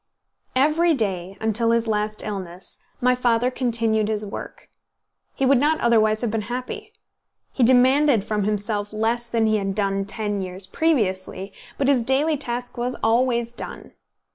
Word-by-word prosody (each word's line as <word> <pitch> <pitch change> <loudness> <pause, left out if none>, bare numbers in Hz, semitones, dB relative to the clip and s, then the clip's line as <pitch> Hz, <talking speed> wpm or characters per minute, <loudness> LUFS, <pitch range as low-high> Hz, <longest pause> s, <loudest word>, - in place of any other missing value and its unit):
Every 310 +5 +3
day, 195 -5 -3
until 220 +1 +1
his 230 0 +2
last 210 -1 -2
illness, 185 -3 -6 0.2
my 250 0 +4
father 245 0 +1
continued 230 -4 0
his 215 -1 -1
work. 200 - -8 0.7
He 270 - 0
would 265 -1 +5
not 310 +3 +2
otherwise 220 -2 +3
have 240 -3 0
been 225 0 -1
happy. 250 +1 -5 0.6
He - - -3
demanded 255 0 +5
from 210 0 -1
himself 210 0 -2
less 230 +2 0
than 230 -1 +1
he 215 0 +2
had 195 -1 -2
done 195 -1 0
ten 205 -1 -2
years 185 +1 -6
previously, 195 - -1 0.2
but 275 - 0
his 275 -3 +4
daily 275 +6 +1
task 245 -3 -5
was 250 +1 -2
always 235 +1 +2
done. - - -8
230 Hz, 155 wpm, -23 LUFS, 210-250 Hz, 0.7 s, would